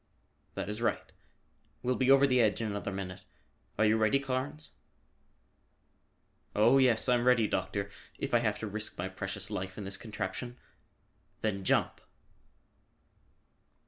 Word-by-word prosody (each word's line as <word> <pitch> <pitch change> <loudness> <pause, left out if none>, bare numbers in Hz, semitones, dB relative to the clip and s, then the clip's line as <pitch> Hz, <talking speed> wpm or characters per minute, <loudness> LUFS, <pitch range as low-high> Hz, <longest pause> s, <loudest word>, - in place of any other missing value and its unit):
"That - - -3
is 105 +2 -4
right. 120 - -1 0.7
We'll 125 - +2
be 130 0 +1
over 135 +1 +7
the 125 -2 +3
edge 105 -2 +2
in 115 - -2
another 100 -1 -3
minute. 95 -1 -6 0.5
Are 110 - +4
you 110 +1 +4
ready, 110 +5 +3
Carnes?" 135 +3 -4 1.8
"Oh, 110 +6 +5
yes, 125 -3 +4
I'm 120 -1 +3
ready, 120 -4 +4
Doctor, 100 +1 -2 0.3
if - - -4
I 120 - +6
have 110 -3 0
to 110 - -5
risk 110 +1 -4
my 90 - -2
precious 100 +2 -5
life 95 -2 -4
in 105 - -5
this 95 0 -4
contraption." 115 +3 -5 0.8
"Then 100 -3 -1
jump!" - - +1
110 Hz, 145 wpm, -31 LUFS, 100-125 Hz, 1.8 s, over